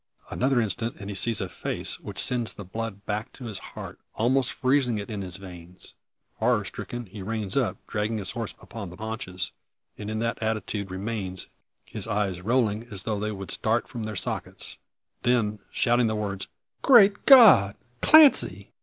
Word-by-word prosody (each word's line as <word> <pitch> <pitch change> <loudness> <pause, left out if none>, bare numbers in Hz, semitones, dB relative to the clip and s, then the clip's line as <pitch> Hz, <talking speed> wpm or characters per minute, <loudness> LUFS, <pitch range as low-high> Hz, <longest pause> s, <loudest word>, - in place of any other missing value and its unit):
Another 130 0 +2
instant 115 +2 -2
and 100 0 -7
he - - -6
sees 105 +3 +1
a 95 - -2
face, 90 - -3
which - - -9
sends 120 -3 +1
the 100 - -9
blood 105 +1 -6
back 105 +1 -3
to 125 - -10
his 105 -4 -5
heart, - - -9 0.2
almost 125 +3 +2
freezing 130 -3 +1
it 100 +2 -6
in 105 -2 -4
his 90 -1 -3
veins. 90 -1 -12 0.4
Horror 110 -3 +2
stricken 120 +5 -6
he 100 +1 -10
reins 105 -1 -2
up, 130 -5 +1
dragging 110 +1 -2
his 100 -3 -4
horse 115 -3 -5
upon 100 -5 -8
the 90 - -11
haunches; 105 -4 -5 0.5
and 105 0 -5
in 110 - -2
this 115 +1 0
attitude 110 -2 -2
remains, 95 -1 -4 0.4
his 105 -2 -3
eyes 100 -4 -1
rolling 115 0 +1
as 100 -4 -6
though 110 -2 -2
they 105 +1 -2
would 95 -2 -6
start 115 +2 0
from 120 -4 -7
their 110 -1 -5
sockets. 90 - -5 0.4
Then, 110 -4 +1
shouting 120 0 +2
the 110 - -1
words, 100 -2 -3 0.3
"Great 205 -6 +6
God, 210 - +8 0.3
Clancy!" 310 -2 +6
110 Hz, 175 wpm, -26 LUFS, 100-120 Hz, 0.5 s, God